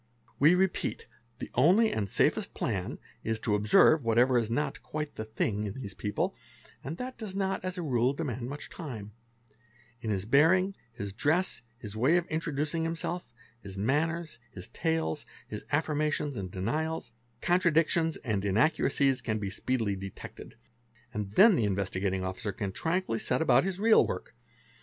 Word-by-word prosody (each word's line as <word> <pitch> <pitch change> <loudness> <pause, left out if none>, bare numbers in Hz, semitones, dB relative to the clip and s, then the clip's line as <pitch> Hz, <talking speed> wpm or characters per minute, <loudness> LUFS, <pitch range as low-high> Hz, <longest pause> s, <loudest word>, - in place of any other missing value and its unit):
We 155 +6 +6
repeat, 185 0 0 0.3
the - - -7
only 185 - +5
and 100 -3 -2
safest: - - +1
plan - - -2 0.3
is 115 0 -1
to 110 - 0
observe 105 +8 +5
whatever 120 +3 +4
is 115 -2 -2
not 135 +4 -1
"quite 150 -1 -4
the 110 - -5
thing" 105 -1 -1
in 100 - -4
these 100 -7 -6
people, 105 +1 -2 0.5
and 140 +5 -4
_ - - -18
that 255 -1 -6
does 210 -4 -5
not 195 -1 -1
as 185 0 -3
a 175 - -3
rule 125 -4 +2
demand 130 -5 -4
much 145 +1 -7
time; 115 - -7 0.9
in 110 - -4
his 100 -2 -1
bearing, 170 - +4 0.2
his 100 -3 -6
dress, 160 - +1 0.2
his: 105 -4 -8
way 130 +10 +4
of 175 - 0
introducing 155 0 -1
himself, 165 -1 -3 0.3
his 100 -2 -9
manners, 155 - 0
his 90 - -7
tales, 160 -2 -1 0.2
his 105 - -6
affirmations 150 -1 0
and 95 -4 -4
i 95 - -10
denials, 155 +9 -2 0.3
contradictions 165 -1 +2
and 105 -6 -2
inaccuracies 135 +5 +2
can 110 -1 -1
be 100 -2 -3
speedily 110 -2 -1
detected, 95 0 -9 0.6
and 105 -1 -4
then 210 - +7
the 120 - +1
Investigating 95 -1 -1
Officer 95 +4 -3
can 100 -2 -4
tranquilly 160 - -1
set - - +1
about 160 - +4
his 190 -2 -2
real 220 +1 +5
work. - - -5
135 Hz, 165 wpm, -30 LUFS, 105-165 Hz, 0.9 s, then